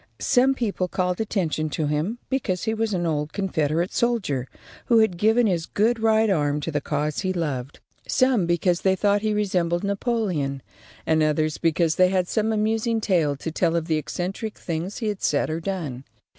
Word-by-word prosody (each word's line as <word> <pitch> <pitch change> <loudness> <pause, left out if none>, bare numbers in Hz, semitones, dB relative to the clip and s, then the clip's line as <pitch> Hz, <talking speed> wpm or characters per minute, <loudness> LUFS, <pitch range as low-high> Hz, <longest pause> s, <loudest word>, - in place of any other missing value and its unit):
Some 265 +1 +3
people 205 -7 -1
called 180 +1 -1
attention 165 -7 -1
to 155 +1 -2
him 150 +10 -1
because 215 -9 -1
he 220 - 0
was 225 0 -1
an 175 -1 -1
old 150 -2 -1
Confederate 170 -3 -1
soldier 195 - 0 0.4
who 235 - +5
had 220 -5 +3
given 220 +6 +3
his 175 -5 0
good 225 +3 +1
right 220 0 +3
arm 150 -6 +1
to 165 - -3
the 145 -1 -1
cause 150 +1 -2
he 185 -1 -1
loved, 145 -7 -3 0.3
some 255 -9 +2
because 175 +1 +1
they 190 -1 +3
thought 205 +1 +2
he 215 0 0
resembled 180 -4 0
Napoleon, 200 - -1 0.4
and 160 0 +2
others 155 0 +1
because 165 -1 +1
they 185 0 +5
had 185 -1 +1
some 220 +2 0
amusing 220 +1 0
tale 170 -9 +1
to 160 +4 -5
tell 165 +1 +1
of 165 -1 0
the 160 -2 +1
eccentric 180 +8 -4
things 170 +4 -4
he 225 - -3
had 205 -2 -3
said 150 +1 +1
or 160 - -2
done. 160 -8 -4
180 Hz, 185 wpm, -24 LUFS, 155-215 Hz, 0.4 s, who